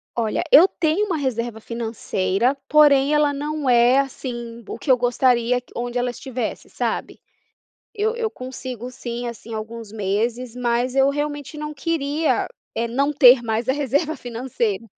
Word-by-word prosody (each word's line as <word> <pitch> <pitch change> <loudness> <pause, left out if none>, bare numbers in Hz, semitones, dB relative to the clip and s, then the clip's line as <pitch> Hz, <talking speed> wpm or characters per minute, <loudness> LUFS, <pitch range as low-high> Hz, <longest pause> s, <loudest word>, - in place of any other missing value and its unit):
Olha, 230 +7 0
eu 335 +6 +9
tenho 335 +3 0
uma 365 -6 -1
reserva 240 -5 -2
financeira, 225 0 -1
porém 290 -1 +5
ela 300 -1 +3
não 295 0 -2
é, 245 +2 +5
assim, 240 -3 -5
o - - -6
que - - -7
eu 255 - +6
gostaria 245 0 +2
onde 240 +1 -3
ela 245 0 0
estivesse, 245 -1 -5
sabe? - - -3 0.8
Eu 435 +2 0
eu 455 -2 -1
consigo 255 - -7
sim, 240 -1 -5
assim, 230 0 -9
alguns 220 0 -7
meses 225 +4 -2
mas 245 +1 0
eu 270 0 +4
realmente 290 0 -4
não 300 0 -5
queria, 305 +1 0 0.3
eh, 235 +1 -1
não 275 +5 +1
ter 255 -4 +7
mais 225 +1 -2
a - - +4
reserva 290 +3 0
financeira. 235 -4 -3
250 Hz, 150 wpm, -22 LUFS, 235-285 Hz, 0.8 s, eu